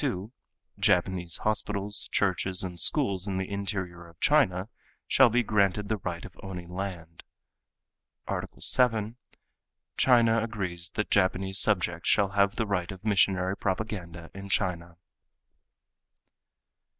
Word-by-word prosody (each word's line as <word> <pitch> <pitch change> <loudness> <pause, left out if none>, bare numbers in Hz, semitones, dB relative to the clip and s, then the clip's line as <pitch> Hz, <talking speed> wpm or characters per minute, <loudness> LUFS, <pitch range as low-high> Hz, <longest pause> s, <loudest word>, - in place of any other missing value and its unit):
2: 110 -7 -3 0.5
Japanese 90 -1 +1
hospitals, 105 -1 0
churches 95 -1 0
and 90 -2 -5
schools 100 - +2
in 95 -2 -2
the 95 0 -2
interior 95 -4 -4
of 85 -1 -19
China 90 +2 +3 0.4
shall - - +6
be 120 +2 +2
granted 100 -1 +1
the 110 - 0
right 85 -3 -5
of - - -12
owning 90 -2 -8
land." 90 -4 -6 1.0
"Art. - - -3
7: 115 -2 +2 0.8
China 115 -3 +4
agrees 90 -6 -4
that 105 - -2
Japanese 95 0 +2
subjects 90 -5 +1
shall 100 -2 +3
have 100 +1 +2
the 115 - -1
right 90 -4 -2
of 95 +2 -10
missionary 95 -2 +2
propaganda 95 -5 -4
in 100 +1 -9
China." 85 -2 -1
95 Hz, 125 wpm, -28 LUFS, 90-105 Hz, 1.0 s, shall